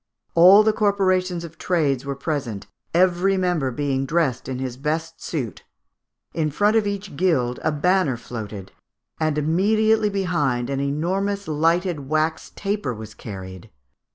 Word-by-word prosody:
"All 185 +5 +8
the 220 0 +3
corporations 185 -4 +1
of 165 -1 -10
trades 145 -7 0
were 140 0 -3
present, 135 -8 -3 0.3
every 185 +2 +3
member 175 -7 0
being 135 +1 -1
dressed 145 -6 0
in 130 - -3
his 130 -1 -4
best 160 +4 -3
suit." 130 -10 -4 0.7
In 155 -2 0
front 205 +9 +2
of 220 -2 +3
each 200 -4 -4
guild 135 -8 +1
a 155 - +2
banner 160 -3 +1
floated; 105 -5 -7 0.5
and 155 -1 0
immediately 210 +7 +2
behind 150 -11 0
an 135 - -1
enormous 185 +8 -1
lighted 165 -1 0
wax 155 +1 0
taper 200 - -2
was 110 0 -9
carried. 95 -4 -9
160 Hz, 140 wpm, -23 LUFS, 135-185 Hz, 0.7 s, All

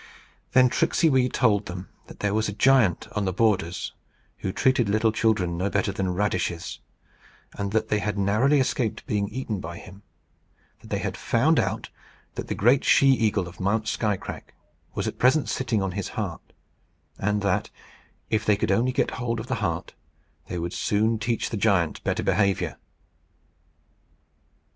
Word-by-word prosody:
Then 130 0 +6
Tricksey 165 +2 +2
Wee 130 -1 +3
told 105 -5 +2
them 90 +1 -6 0.2
that - - -12
there 105 -1 0
was 110 0 +1
a - - -4
giant 115 -5 +3
on 105 -1 0
the 95 - 0
borders 95 -4 0 0.4
who 95 - -3
treated 125 0 +2
little 110 +2 +2
children 105 -7 +1
no 95 +2 0
better 100 0 0
than 95 -2 -2
radishes, 90 -4 -2 0.7
and 100 -1 -3
that 110 0 0
they 105 - +2
had 105 0 -2
narrowly 110 +9 +3
escaped 125 -3 -1
being 100 -1 0
eaten 110 -2 -4
by 85 0 -7
him; 95 +2 -12 0.8
that - - -15
they - - 0
had - - -3
found 140 +6 +2
out - - -2 0.4
that - - -5
the - - -2
great 125 +6 +4
she 135 - +5
eagle 110 -8 +2
of 90 - -12
Mount 105 +3 0
Skycrack 105 -3 -3 0.4
was - - -2
at - - -5
present 135 +4 +4
sitting 115 -6 0
on 95 - -2
his 100 +1 -3
heart; - - -4 0.7
and 105 0 0
that, 100 -2 0 0.6
if 110 0 +1
they 105 -2 +3
could 100 - 0
only 120 +6 +2
get 130 - 0
hold 115 -1 -1
of 110 - -5
the 130 - -3
heart, 85 -5 -2 0.5
they 90 - -4
would 85 +1 -3
soon 110 +2 +1
teach 115 +1 -1
the 110 - -2
giant 100 -6 +1
better - - -1
behaviour. 100 -3 +1
105 Hz, 170 wpm, -25 LUFS, 100-115 Hz, 0.8 s, Then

